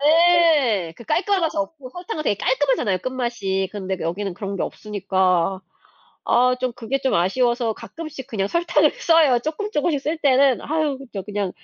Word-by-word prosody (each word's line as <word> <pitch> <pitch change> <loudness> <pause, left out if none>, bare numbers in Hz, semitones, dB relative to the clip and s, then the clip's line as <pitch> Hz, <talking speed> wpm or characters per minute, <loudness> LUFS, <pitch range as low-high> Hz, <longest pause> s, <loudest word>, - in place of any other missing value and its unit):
네. 305 - +4
그 - - -11
깔끔한 390 - +1
맛이 325 - -1
없고 255 +6 -4
설탕은 355 0 -5
되게 205 - 0
깔끔하잖아요, 255 -6 +1
끝맛이. 235 -7 -2
근데 190 -2 -3
여기는 190 +4 -3
그런 195 0 -5
게 - - -2
없으니까. 190 -3 0 0.6
아 250 +1 +3
좀 255 -1 -1
그게 245 +3 -3
좀 265 - 0
아쉬워서 235 +6 +1
가끔씩 305 +2 -9
그냥 195 -4 -1
설탕을 340 +9 +2
써요. 320 - +4
쪼끔쪼끔씩 310 - -1
쓸 310 +4 -2
때는 275 -3 +3
아유 305 -2 -1 0.2
저 195 - -4
그냥 200 -1 -3
250 Hz, 345 characters per minute, -22 LUFS, 200-310 Hz, 0.6 s, 네